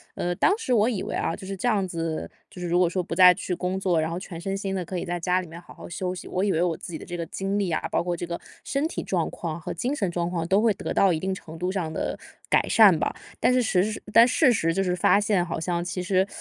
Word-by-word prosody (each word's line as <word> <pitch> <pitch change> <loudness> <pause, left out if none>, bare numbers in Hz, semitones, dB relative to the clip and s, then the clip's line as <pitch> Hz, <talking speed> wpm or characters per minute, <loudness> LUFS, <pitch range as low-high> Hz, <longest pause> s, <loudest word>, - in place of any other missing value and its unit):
呃， 175 0 -2
当 390 - +3
时 280 - -4
我 220 -2 +4
以 220 -7 -1
为 - - -4
啊， 165 - -1
就 190 - -10
是 195 0 -5
这 245 - -1
样 200 -5 +2
子， 165 -2 -3 0.2
就 180 - -11
是 175 - -3
如 175 +1 +2
果 180 -1 +4
说 180 +2 -1
不 170 - -5
再 180 0 +8
去 180 0 -3
工 185 +2 -2
作， 180 -4 +1
然 160 +1 -1
后 170 - -3
全 175 -3 -8
身 195 +2 -3
心 195 -1 -3
地 185 -2 -3
可 180 +1 -4
以 - - -4
在 175 0 -3
家 180 +2 +1
里 180 - -9
面 165 +1 -10
好 175 - -14
好 - - -11
休 180 +1 -3
息， 185 - -8
我 185 - -1
以 200 - +2
为 165 - +1
我 175 -2 0
自 - - -9
己 160 - -4
的 - - -10
这 175 - -5
个 170 - -3
精 195 +4 -3
力 195 -4 0
啊， 160 - 0
包 - - +1
括 175 0 -1
这 175 - -5
个 170 0 -4 0.2
身 285 +3 -1
体 - - -4
状 175 -4 -1
况 165 -1 -5
和 - - -5
精 255 - -2
神 195 -9 -1
状 170 0 -1
况 170 -2 -2
都 195 +3 +3
会 225 0 +4
得 - - -4
到 195 - +4
一 160 - 0
定 190 +3 -2
程 165 -3 -9
度 180 +3 -2
上 180 -5 -2
的 155 - -2 0.4
改 - - +5
善 205 -7 +7
吧。 - - -1 0.2
但 - - +3
是 250 0 +3
实 210 0 0
但 230 +2 +8
事 255 0 +4
实 165 -6 +1
就 195 - +1
是 180 -1 0
发 200 - +4
现， 205 -3 +2
好 170 -2 -4
像 175 +1 -1
其 180 +1 -4
实， 190 +1 +2
180 Hz, 330 characters per minute, -25 LUFS, 170-195 Hz, 0.4 s, 再